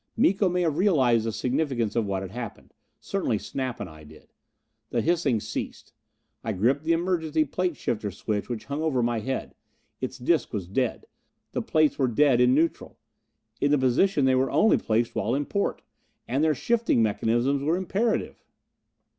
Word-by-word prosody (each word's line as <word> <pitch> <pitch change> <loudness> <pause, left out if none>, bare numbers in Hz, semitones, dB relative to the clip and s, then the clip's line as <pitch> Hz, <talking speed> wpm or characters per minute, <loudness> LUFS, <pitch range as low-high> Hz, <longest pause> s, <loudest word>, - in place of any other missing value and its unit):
Miko 195 -3 +3
may 180 0 0
have 160 -1 0
realized 130 - +3
the - - 0
significance 125 -2 -1
of 115 -3 +1
what 95 -1 -2
had 95 - -7
happened. 115 -1 -8 0.3
Certainly - - -1
Snap 130 -3 -4
and 105 - -4
I 80 -2 -13
did. 75 - -17 0.6
The 120 - 0
hissing 160 -8 +2
ceased. - - -6 0.5
I 110 - -2
gripped 130 +10 +1
the 165 - +3
emergency 165 -3 0
plate 180 +1 -2
shifter 105 -2 -2
switch 105 +3 -3
which 120 -3 -4
hung 140 +2 -3
over 140 -6 +1
my 120 -1 0
head. 130 +5 -4 0.5
Its 130 - -4
disc 135 +3 0
was 95 -5 -3
dead! 120 +5 -1 0.5
The - - -2
plates 155 -2 +2
were 135 - +3
dead 125 +1 +3
in 125 +1 +5
neutral. 165 +3 -1 0.6
In 145 - +2
the 150 - +4
positions 130 +4 +2
they 130 - +4
were 130 +1 +2
only 220 - +4
placed 115 +1 0
while 115 +4 0
in 145 +1 -1
port! 200 +5 -2 0.4
And 135 +5 0
their 155 -1 +3
shifting 230 - +1
mechanisms 120 +6 +1
were 160 +5 +1
imperative! 200 +5 -1
130 Hz, 175 wpm, -26 LUFS, 115-160 Hz, 0.6 s, in